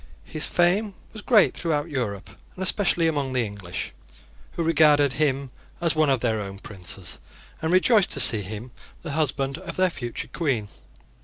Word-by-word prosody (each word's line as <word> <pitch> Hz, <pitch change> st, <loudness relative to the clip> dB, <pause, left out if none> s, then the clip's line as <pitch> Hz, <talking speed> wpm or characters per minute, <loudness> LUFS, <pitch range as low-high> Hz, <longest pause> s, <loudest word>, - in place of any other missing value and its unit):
His 155 Hz, -, +1 dB
fame 190 Hz, +4 st, +1 dB, 0.2 s
was 215 Hz, -, -8 dB
great 215 Hz, -2 st, +4 dB
throughout 160 Hz, -1 st, -2 dB
Europe, 110 Hz, -8 st, -3 dB, 0.2 s
and 190 Hz, -, -4 dB
especially 185 Hz, -3 st, +1 dB
among 145 Hz, -5 st, -1 dB
the 125 Hz, -2 st, +1 dB
English, 100 Hz, -4 st, -6 dB, 0.6 s
who 170 Hz, -, -2 dB
regarded 150 Hz, -4 st, +4 dB
him 140 Hz, -3 st, -1 dB, 0.3 s
as 170 Hz, -2 st, 0 dB
one 155 Hz, -2 st, +3 dB
of 130 Hz, -3 st, +1 dB
their 110 Hz, -3 st, 0 dB
own 100 Hz, -1 st, -7 dB
princes, 95 Hz, -2 st, -4 dB, 0.4 s
and 160 Hz, 0 st, -1 dB
rejoiced 195 Hz, +2 st, +4 dB
to -, -, -2 dB
see 120 Hz, -4 st, +6 dB
him 110 Hz, +5 st, -8 dB, 0.3 s
the 155 Hz, -, -5 dB
husband 140 Hz, -2 st, -1 dB
of 170 Hz, -3 st, -8 dB
their 185 Hz, -1 st, +2 dB
future 120 Hz, -7 st, -5 dB
Queen. 130 Hz, -, -2 dB
145 Hz, 165 wpm, -24 LUFS, 120-170 Hz, 0.6 s, see